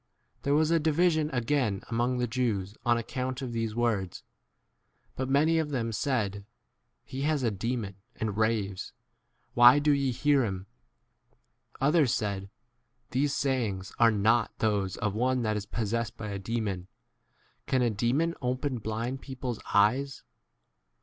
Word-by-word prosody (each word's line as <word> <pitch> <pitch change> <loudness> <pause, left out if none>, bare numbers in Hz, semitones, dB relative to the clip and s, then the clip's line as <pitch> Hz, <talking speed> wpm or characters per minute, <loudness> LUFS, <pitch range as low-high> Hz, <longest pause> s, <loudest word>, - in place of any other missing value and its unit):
19 - - -40
There 140 +1 +1
was 155 +1 +3
a 165 - +4
division 160 0 +2
u 150 - -9
again 120 -5 0
among 120 +2 0
the 125 - +1
Jews 110 -5 -1
on 120 0 +3
account 130 +3 -3
of 125 -2 -4
these 115 -2 -2
20 120 - -4
words; 100 -6 -1 0.9
but 130 0 -3
many 155 +4 +3
of 155 -2 -1
them 120 -5 -1
said, 105 -5 -1 0.6
He 130 - -6
has 150 -1 +1
a 115 - +2
demon 105 -1 -3 0.2
and 110 -3 -3
raves; 105 -3 -1 0.6
why 120 +1 +9
21 145 +1 +1
do 150 - +4
ye 140 -2 +2
hear 140 +2 +3
him? 95 -4 -3 1.2
Others 145 -2 +3
said, 100 -2 -3 0.6
These 140 +2 +1
sayings 110 -8 -1
are 115 -1 +7
not 110 +2 +2
[those] 100 -4 0
of 105 - -1
one 125 +3 +1
that 110 -1 0
is 105 -1 -4
possessed 115 0 -2
by 110 - -5
a 100 -1 -4
demon. 100 -3 -3 0.8
Can 130 -1 +2
a 120 - +2
demon 125 +11 +1
open 130 +1 -1
blind 115 +5 -3
people's 130 -3 -5
22 - - -14
eyes 130 +7 +2
120 Hz, 160 wpm, -29 LUFS, 105-135 Hz, 1.2 s, why